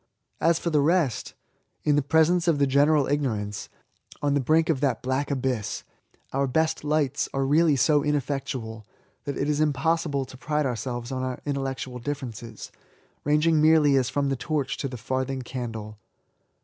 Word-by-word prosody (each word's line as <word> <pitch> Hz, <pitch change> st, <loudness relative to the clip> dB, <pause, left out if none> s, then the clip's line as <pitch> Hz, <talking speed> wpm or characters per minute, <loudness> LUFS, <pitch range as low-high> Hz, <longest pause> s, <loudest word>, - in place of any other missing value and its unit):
As 165 Hz, 0 st, +3 dB
for 170 Hz, -, -2 dB
the 150 Hz, -2 st, +3 dB
rest; 155 Hz, -5 st, +1 dB, 0.5 s
in 150 Hz, -1 st, +3 dB
the 145 Hz, -, +3 dB
presence 160 Hz, +5 st, +3 dB
of 165 Hz, -3 st, +3 dB
the 140 Hz, -, +3 dB
general 145 Hz, +2 st, +4 dB
ignorance^ 110 Hz, -8 st, -2 dB, 0.5 s
on 145 Hz, -1 st, +1 dB
the 145 Hz, -, +2 dB
brink 160 Hz, +5 st, +3 dB
of 155 Hz, -6 st, 0 dB
that 140 Hz, -3 st, 0 dB
black 130 Hz, +2 st, -1 dB
abyss, 130 Hz, -6 st, -2 dB, 0.5 s
our 135 Hz, +1 st, +1 dB
best 160 Hz, +5 st, 0 dB
lights 145 Hz, -2 st, 0 dB
are 135 Hz, 0 st, +1 dB
really 155 Hz, +2 st, +4 dB
so 145 Hz, +2 st, +3 dB
ineffectual, 135 Hz, -6 st, -2 dB, 0.4 s
that 140 Hz, -2 st, -3 dB
it 140 Hz, -, -1 dB
is 150 Hz, 0 st, +1 dB
impossible 155 Hz, -1 st, +1 dB
to 130 Hz, +1 st, -12 dB
pride 150 Hz, +2 st, -1 dB
ourselves 120 Hz, 0 st, -3 dB
on 130 Hz, -1 st, -2 dB
our 130 Hz, -1 st, -3 dB
intellectual 135 Hz, -3 st, -3 dB
differences, 120 Hz, -4 st, -6 dB, 0.5 s
ranging 150 Hz, +2 st, +3 dB
merely 155 Hz, -2 st, +5 dB
as 130 Hz, -2 st, +2 dB
from 140 Hz, -1 st, 0 dB
the 135 Hz, -, 0 dB
torch 140 Hz, +1 st, -2 dB
to 140 Hz, -, -2 dB
the 125 Hz, -2 st, -7 dB
farthing 130 Hz, +3 st, -2 dB
candle. 110 Hz, -4 st, -6 dB
140 Hz, 165 wpm, -26 LUFS, 130-150 Hz, 0.5 s, merely